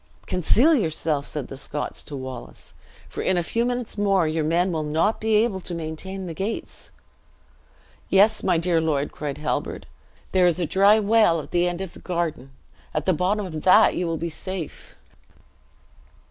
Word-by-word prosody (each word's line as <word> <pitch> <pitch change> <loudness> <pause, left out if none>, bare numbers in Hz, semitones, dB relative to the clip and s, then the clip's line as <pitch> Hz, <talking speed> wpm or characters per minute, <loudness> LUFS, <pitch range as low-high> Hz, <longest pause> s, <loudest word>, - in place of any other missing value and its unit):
"Conceal 235 - +3
yourself," 160 - 0
said 145 -4 -4
the - - -8
Scots 145 +2 -5
to 145 - -7
Wallace; 130 -1 -8 0.3
"for - - -6
in 185 - +1
a 175 - +1
few 230 +7 0
minutes 245 -3 -3
more 195 -5 +3
your 155 0 -1
men 175 +4 +1
will 160 -2 -1
not 160 +8 0
be 220 0 +2
able 210 -3 +2
to 180 -1 -6
maintain 170 +4 -5
the 170 - -5
gates." 195 +7 -5 1.2
"Yes, 210 +3 +4
my - - +2
dear 165 0 +2
lord," 150 -3 0
cried 145 -2 -5
Halbert, 150 - -3 0.5
"there 185 -1 +4
is 175 0 +1
a 175 - +1
dry 200 +6 +5
well 215 -5 +3
at 145 - -9
the 175 0 +2
end 175 +1 -5
of 190 -3 -6
the - - -12
garden; 170 -7 -3 0.5
at 155 0 -1
the 185 - +3
bottom 195 +5 0
of 160 -4 -6
that 200 +6 +6
you 180 - -1
will 165 -1 -1
be 170 - -3
safe." 180 +1 -7
175 Hz, 180 wpm, -24 LUFS, 155-195 Hz, 1.2 s, that